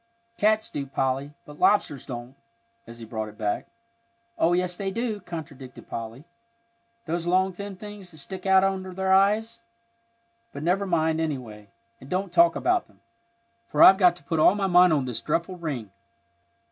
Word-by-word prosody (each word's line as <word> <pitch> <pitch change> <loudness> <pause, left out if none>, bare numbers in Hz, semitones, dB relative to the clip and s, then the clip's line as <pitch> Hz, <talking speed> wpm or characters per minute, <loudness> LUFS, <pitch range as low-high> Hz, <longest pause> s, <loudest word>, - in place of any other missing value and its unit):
"Cats 215 +1 +1
do, 140 -2 -4
Polly, 135 +2 -2
but 150 0 -13
lobsters 155 -10 +2
don't," 120 -1 -7 0.5
as 115 - -11
he 115 - -9
brought 110 -1 -5
it 105 - -16
back. 105 -1 -2 0.7
"Oh, 170 +2 +2
yes, 180 0 0
they 195 +1 -3
do," 220 +1 -3
contradicted 155 -8 -9
Polly; 115 +4 -6 0.8
"those 170 +1 -3
long 185 +1 +2
thin 200 +2 -7
things 205 -1 -10
that 160 - -15
stick 190 +6 -7
out 190 0 +5
under 190 -1 -2
their 190 0 +1
eyes. 215 +4 +2 0.9
But 140 - -6
never 190 +4 +1
mind, 160 -2 +1
anyway, 120 -9 -5 0.3
and 135 - -14
don't 185 +1 -2
talk 170 -1 +5
about 360 0 +1
them, - - -26 0.7
for - - +4
I've 190 +1 +9
got 180 -3 +5
to 175 - -17
put 160 +2 -2
all 170 - +5
my 200 -1 -1
mind 180 -1 +5
on 145 -4 +1
this 120 -2 -4
dreadful 170 +8 -2
ring." 130 - -5
175 Hz, 170 wpm, -25 LUFS, 140-190 Hz, 0.9 s, I've